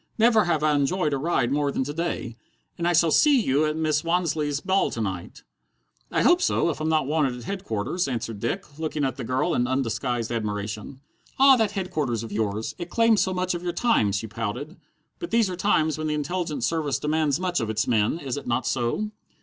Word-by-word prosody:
"Never 225 -2 +4
have 160 -3 0
I 155 -1 +3
enjoyed 150 +2 +1
a 140 - 0
ride 135 -5 0
more 145 0 +1
than 135 - -1
to 145 +3 -5
day. 155 -8 -3 0.4
And 170 - -2
I 175 - +3
shall 165 -1 +4
see 290 - +5
you 150 - +2
at 155 - -1
Mrs. 155 -2 0
Wansleigh's 160 -4 0
ball 190 +4 +1
to - - -6
night?" 95 -5 -5 0.7
"I - - +1
hope 350 +7 +5
so 170 - +2
if 155 - -7
I'm 155 - 0
not 155 -3 +2
wanted 145 -3 +1
at 120 - -9
Headquarters," 175 - -2
answered 115 -4 -4
Dick, 150 - -4
looking 155 -2 -1
at 130 - -2
the - - -5
girl 130 +8 0
in 120 -3 +1
undisguised 125 -2 -1
admiration. 105 +3 -4 0.4
"Ah, 270 0 +7
that 220 -4 +1
Headquarters 155 - -2
of 115 - -8
yours! 105 0 -2
It 175 0 -5
claims 230 +1 +3
so 190 - +1
much 185 0 -1
of 175 - -4
your 175 -1 -3
time!" 175 - +2
she 100 +3 -2
pouted. 115 - -5 0.4
"But 345 - -5
these 230 -4 +2
are - - -3
times 160 -6 +1
when 155 - -2
the 150 - 0
Intelligence 150 -3 -2
Service 150 -1 0
demands 150 -1 0
much 180 -3 0
of 115 -3 -2
its 110 -1 0
men, 110 +4 +2
is 140 -5 -4
it 140 - -7
not 120 +1 0
so?" 130 - -1
150 Hz, 215 wpm, -25 LUFS, 120-175 Hz, 0.7 s, Ah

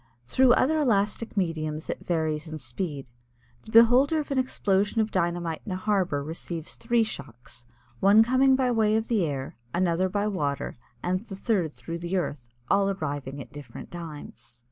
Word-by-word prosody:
Through 255 - +5
other 310 +6 +3
elastic 220 -4 0
mediums 155 -4 -1
it - - -5
varies 160 -2 -1
in 155 - -4
speed. 135 0 -5 0.5
The - - -15
beholder 245 +7 +6
of 295 - -5
an 270 - +2
explosion 205 -4 +1
of 215 0 +1
dynamite 170 -2 -1
in 205 - -6
a - - -1
harbor 185 -7 0
receives 165 +1 -5
three 235 0 +2
shocks, 125 - -8 0.3
one 205 +3 +7
coming 260 +3 +4
by 260 -1 +1
way 220 -2 +3
of 220 0 -1
the 220 -6 +2
air, 135 -2 -5 0.2
another 180 +1 +1
by 205 +2 0
water, 150 -9 -2 0.3
and 185 +1 0
the 200 - -8
third 190 -6 0
through 165 +3 -6
the 175 +2 -2
earth, 145 -8 -3 0.2
all 200 +6 +3
arriving 145 -7 -4
at 130 - -10
different 145 -1 -10
times. 145 -8 -9
185 Hz, 170 wpm, -27 LUFS, 155-220 Hz, 0.5 s, one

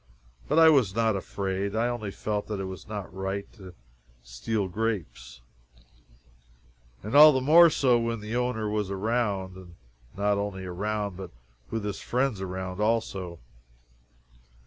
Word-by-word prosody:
But - - 0
I 165 0 +8
was 125 -11 +3
not 115 -2 +2
afraid. 95 +1 -3
I 115 +2 +1
only 120 -4 -3
felt 105 +1 -3
that 105 -2 -4
it - - -3
was 95 0 -8
not 100 -3 -6
right 95 +1 -3
to 95 -5 -13 0.5
steal - - -3
grapes. 90 - -4 1.6
And 105 - -6
all 150 +2 +10
the 130 - +1
more 165 +6 +7
so 130 -5 +2
when 115 -1 -2
the 105 +2 -5
owner 125 -3 -1
was 105 -2 -2
around 100 -2 -1
and 90 -2 -13 0.4
not 100 0 +1
only 100 -2 -4
around, 100 +1 -3
but 95 - -7 0.4
with 110 -2 -3
his 105 - -4
friends 125 -5 -1
around 95 0 -5
also. 100 -6 -1
105 Hz, 145 wpm, -27 LUFS, 95-115 Hz, 1.6 s, all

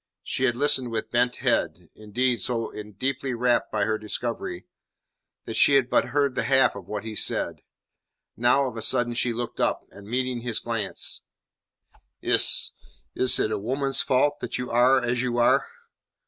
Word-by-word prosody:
She 130 - -1
had 120 -2 +1
listened 130 -2 +2
with 110 -1 -4
bent 120 +1 +1
head; - - -1
indeed, 120 +4 -1
so 115 -2 -1 0.2
deeply 130 +1 -2
rapt 120 +1 +1
by - - 0
her 110 -1 -1
discovery, 110 -3 -4 0.8
that 115 - -5
she 140 +5 +5
had 130 -2 +2
but - - +3
heard 140 +1 0
the - - -1
half 135 -4 +3
of 100 -3 -10
what 105 0 -5
he 110 -1 -7
said. - - -1 0.7
Now, 120 +4 +3
of 125 - -7
a - - -4
sudden, 120 0 +2
she 120 0 +1
looked 120 0 -5
up, - - 0
and 100 0 -14
meeting 125 +1 -2
his 120 -2 -2
glance: 115 -4 -3 1.0
"Is - - +3 0.4
is 130 - +3
it 110 - 0
a - - -1
woman's 135 +5 +1
fault 145 +3 +1
that - - -4
you 125 0 -5
are 125 +3 +4
as 120 0 0
you 125 -2 -2
are?" 120 - +3
120 Hz, 175 wpm, -25 LUFS, 115-130 Hz, 1.0 s, she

